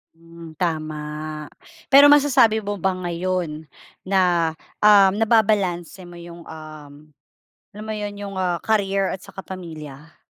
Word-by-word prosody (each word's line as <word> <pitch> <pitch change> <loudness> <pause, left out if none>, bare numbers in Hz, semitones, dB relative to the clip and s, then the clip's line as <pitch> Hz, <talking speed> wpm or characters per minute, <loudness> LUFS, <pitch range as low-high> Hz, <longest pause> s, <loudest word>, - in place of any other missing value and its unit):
Hmm, 165 -1 -14
tama. 155 -3 -2 1.0
Pero 285 +1 +9
masasabi 255 -7 +4
mo 205 -3 -4
ba 190 -1 0
ngayon 175 -3 -3 0.3
na, 180 -4 +1 0.3
um, 200 -2 +6
nababalanse 205 -5 +1
mo 175 - -12
yung, 170 0 -11
um, 155 -2 -11 0.8
alam 210 +1 -8
mo 220 - -4
'yon 205 -1 -5
yung, 200 -1 -7
ah, 180 -2 -1
career 195 -3 0
at 185 - -6
saka 195 - -10
pamilya? 155 -5 -10
185 Hz, 125 wpm, -22 LUFS, 165-205 Hz, 1.0 s, Pero